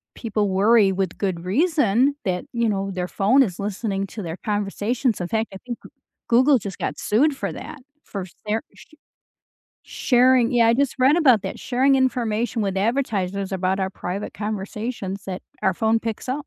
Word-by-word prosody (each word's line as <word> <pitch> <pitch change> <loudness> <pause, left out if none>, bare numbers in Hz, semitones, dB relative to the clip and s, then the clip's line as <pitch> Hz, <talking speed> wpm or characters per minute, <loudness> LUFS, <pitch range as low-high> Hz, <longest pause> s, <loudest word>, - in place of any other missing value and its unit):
people 210 -3 -1
worry 200 +1 +4
with 190 -2 -2
good 180 -4 -2
reason 275 - +2
that, 180 -2 -1
you 235 -1 +1
know, 195 -1 -1
their 180 -1 -3
phone 250 +8 +4
is 185 -7 -4
listening 200 -1 -2
to 210 +1 -7
their 165 0 -5
conversations. 210 +3 -1
In 175 - -2
fact, 220 +1 -1
I - - -6
think 240 -2 -5
G - - -12 0.4
Google 255 +4 +5
just 200 -4 -7
got - - -3
sued 275 +8 +2
for - - -3
that 300 - -8 0.2
for 195 -3 -6 0.2
sar 215 +2 0
sh - - -18 0.9
sharing 250 -1 +3
yeah, 230 -2 +4
I - - +5
just 275 +1 +1
read 265 +4 +5
about 255 - +5
that, 190 - -5
sharing 265 +2 +2
information 240 -3 0
with 195 -1 -2
advertisers 200 -4 -1
about 190 +1 0
our 190 0 -1
private 190 +2 -5
conversations 205 -1 -4
that 185 -1 -5 0.2
our 190 - +2
phone 220 +4 +2
picks 225 +2 -5
up. 285 +3 -3
215 Hz, 180 wpm, -23 LUFS, 195-250 Hz, 0.9 s, Google